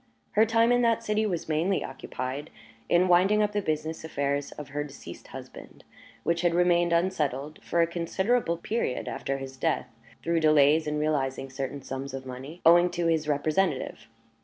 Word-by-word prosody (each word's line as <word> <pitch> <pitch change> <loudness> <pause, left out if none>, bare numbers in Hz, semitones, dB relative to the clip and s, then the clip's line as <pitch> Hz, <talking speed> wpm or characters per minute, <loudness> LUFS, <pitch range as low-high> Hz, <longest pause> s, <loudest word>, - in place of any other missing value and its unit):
Her 220 +2 +4
time 230 +1 +3
in 245 0 +4
that 230 -1 +2
city 215 0 +1
was 175 -5 -3
mainly 160 +5 +1
occupied 130 +2 -5 0.4
in 175 +2 +4
winding 190 +4 +4
up 210 - 0
the 205 0 -1
business 155 -2 -3
affairs 140 -2 -2
of 150 -2 -9
her 145 +1 -2
deceased 145 -1 -11
husband, - - -11 0.4
which 170 0 +1
had 175 -1 +2
remained 175 -1 +3
unsettled 155 -5 0
for 170 - +1
a - - +4
considerable 175 +3 0
period 190 - -2
after 135 - -3
his 135 -1 -8
death, 125 - -1 0.3
through 170 0 +1
delays 155 0 +4
in 150 0 -1
realizing 135 -3 -1
certain 135 +1 -5
sums 135 +1 -5
of 135 0 -7
money 130 +6 -8
owing 175 +2 +7
to 175 -1 -2
his 160 -2 +1
representative. 150 -5 0
160 Hz, 170 wpm, -27 LUFS, 140-180 Hz, 0.4 s, owing